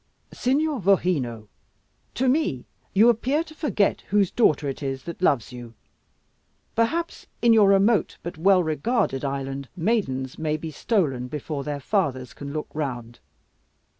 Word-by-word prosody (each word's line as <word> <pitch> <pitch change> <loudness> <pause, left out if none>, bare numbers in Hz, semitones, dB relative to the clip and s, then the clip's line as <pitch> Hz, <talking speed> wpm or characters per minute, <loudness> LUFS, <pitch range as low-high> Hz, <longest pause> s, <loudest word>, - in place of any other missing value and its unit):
"Signor 285 +2 0
Vogheno, 165 - +1 0.7
to 260 - +1
me 255 - +1 0.3
you 215 +4 +5
appear 255 +7 +2
to 315 - -14
forget 290 -10 0
whose 200 -2 +2
daughter 155 - +2
it 135 - -4
is 135 -1 -3
that 170 +1 -8
loves 140 -11 +2
you. 120 -2 -10 1.0
Perhaps 325 +10 -1
in 235 -1 +5
your 210 -3 +6
remote, 200 +2 +3
but 175 - -5
well 185 +3 +4
regarded 160 - 0
island 135 -1 -4
maidens 160 - -1
may 155 -1 -1
be 160 +1 -6
stolen 140 - 0
before 145 +1 -5
their 145 0 -4
fathers 135 - -1
can 140 0 -8
look 155 +1 -4
round. 120 -6 -4
160 Hz, 140 wpm, -24 LUFS, 135-225 Hz, 1.0 s, your